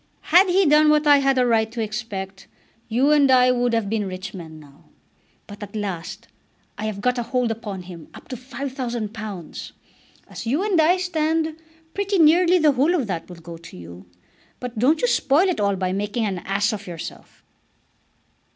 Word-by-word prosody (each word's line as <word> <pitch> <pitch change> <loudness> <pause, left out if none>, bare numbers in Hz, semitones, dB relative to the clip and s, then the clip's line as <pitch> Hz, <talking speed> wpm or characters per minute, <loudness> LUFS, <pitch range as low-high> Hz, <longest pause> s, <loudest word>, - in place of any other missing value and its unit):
Had 370 +3 +7
he 380 +2 +3
done 300 0 +5
what 300 0 +3
I 290 -1 +6
had 270 -1 +2
a 250 - +3
right 225 -2 +1
to 235 - -7
expect, 205 -3 -5 0.4
you 255 +6 +2
and 290 -2 +4
I 255 -1 +5
would 245 -1 +1
have 225 -3 0
been 210 -1 -1
rich 190 +2 -7
men 160 -4 -9
now. 145 -2 -18 0.6
But 205 +1 -12
at 205 0 -8
last 195 +1 -5 0.5
I 210 - -5
have 205 -2 -5
got 250 +2 +1
a - - 0
hold 245 0 -1
upon 210 -4 -6
him 175 -3 -11
up - - -13
to 260 - -4
£5000. 235 - -6 0.6
As - - -8
you 290 +11 +1
and 390 -6 +2
I 345 +4 +4
stand, 320 -3 -1 0.4
pretty 400 0 -1
nearly 345 +3 +5
the 310 -3 +4
whole 285 +7 +2
of 285 -8 0
that 180 -5 -5
will 180 - -9
go 165 0 -10
to 165 - -13
you. 85 +1 -12 0.5
But 245 -3 -6
don't 295 - +2
you - - +4
spoil 325 - +3
it 365 - -1
all 200 -1 +1
by 185 -1 -2
making 205 +3 -2
an 190 -3 -2
ass 195 +4 -1
of 205 -2 -7
yourself." 170 -2 -9
230 Hz, 190 wpm, -22 LUFS, 195-295 Hz, 0.6 s, Had